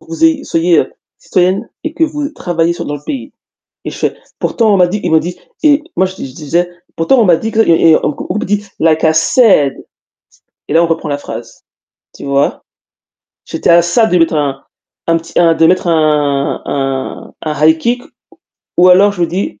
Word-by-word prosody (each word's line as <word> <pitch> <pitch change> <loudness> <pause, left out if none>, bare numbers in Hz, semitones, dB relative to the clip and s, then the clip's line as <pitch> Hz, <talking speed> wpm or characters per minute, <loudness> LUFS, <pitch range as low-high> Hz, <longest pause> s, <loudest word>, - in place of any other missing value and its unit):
que - - -20
vous 165 - -1
ayez 320 -3 +2
soyez 165 -1 +2
heu, 130 - -5 0.3
citoyenne 185 +2 0 0.2
et 315 - -3
que 330 - +2
vous 295 -2 -4
travaillez 170 - -1
sur - - -6
dans 145 - -3
le 145 - -14
pays. 265 - -6 0.5
Et - - -4
je - - -10
fais: - - -1 0.2
«Pourtant 220 -3 +1
on - - +4
m'a 180 -1 +4
dit 200 +4 -3
ils 175 - -1
m'ont 160 - +5
dit» 175 +3 -5 0.2
et 300 -1 +4
moi, 190 - +3
je 185 - -8
di - - -6
je 130 - -14
disais: 170 +4 -1 0.3
«Pourtant 240 +10 +3
on - - +4
m'a 175 -4 +4
dit 225 +6 -4
que» 225 - 0
et 165 -5 +4
et 155 - +6
on 150 - -1 0.2
on - - -1
me - - -3
dit: 205 +1 -1 0.2
«Like 160 -1 +2
I 160 - +5
said» 160 - +3 0.9
et - - -3
là, 165 - +4
on - - +1
reprend 165 -2 -2
la 145 - -1
phrase, 115 -4 -9 0.5
tu - - -11
vois? 140 0 0 0.8
J'était - - -2
à 170 0 +6
ça 175 +7 +2
de 180 -5 +1
mettre 165 -1 +2
un 140 -2 -2 0.4
un 165 0 +3
petit, 165 0 -8
un, 170 -1 +4
de 165 - +3
mettre 180 +1 +1
un 150 -4 +1
un 135 -1 -4
un 150 -1 -1
high 160 0 +4
kick, 240 +8 -1 0.7
ou 180 +1 +5
alors 195 +3 +5
je 200 - -12
vous 170 - +2
dis 170 - -4
170 Hz, 225 wpm, -13 LUFS, 155-200 Hz, 0.9 s, et